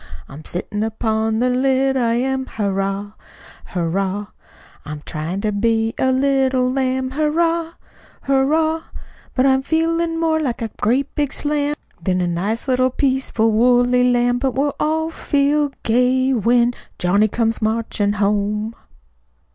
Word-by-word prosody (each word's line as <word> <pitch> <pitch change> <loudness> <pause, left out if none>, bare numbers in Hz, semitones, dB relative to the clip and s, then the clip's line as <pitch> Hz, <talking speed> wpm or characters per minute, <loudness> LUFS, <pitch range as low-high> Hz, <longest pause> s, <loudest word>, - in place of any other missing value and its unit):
I'm 145 +3 -11
sittin' 195 +5 -4
upon 220 0 -1
the 250 +2 +2
lid, 265 +1 +2
I 235 -3 +1
am, 265 +1 -1
Hurrah! 195 -1 -2 0.5
Hurrah! 190 +4 -2 0.5
I'm 150 0 -8
tryin' 165 +5 -4
to 215 0 0
be 225 +2 +1
a 260 - +2
little 260 -1 +2
lamb, 260 0 -1
Hurrah! 330 +3 0 0.5
Hurrah! 310 +4 +2 0.5
But 255 - +3
I'm 265 -1 +4
feelin' 330 +2 0
more 320 -1 +1
like 250 -6 -2
a 225 - -4
great 260 +6 +1
big 290 -2 -1
slam 295 0 -1 0.3
Than 185 +1 +1
a 180 - +1
nice 195 +9 -2
little 255 0 +2
peaceful 260 -4 +1
woolly 245 +2 +3
lamb, 245 0 +2
But 265 -1 -1
we'll 285 +2 +1
all 320 +1 0
feel 290 -1 +1
gay 255 +3 +2
when 240 +1 +3 0.2
Johnny 200 +4 +3
comes 225 +1 -1
marchin' 215 -2 0
home." 210 +2 0
250 Hz, 135 wpm, -20 LUFS, 215-275 Hz, 0.5 s, I'm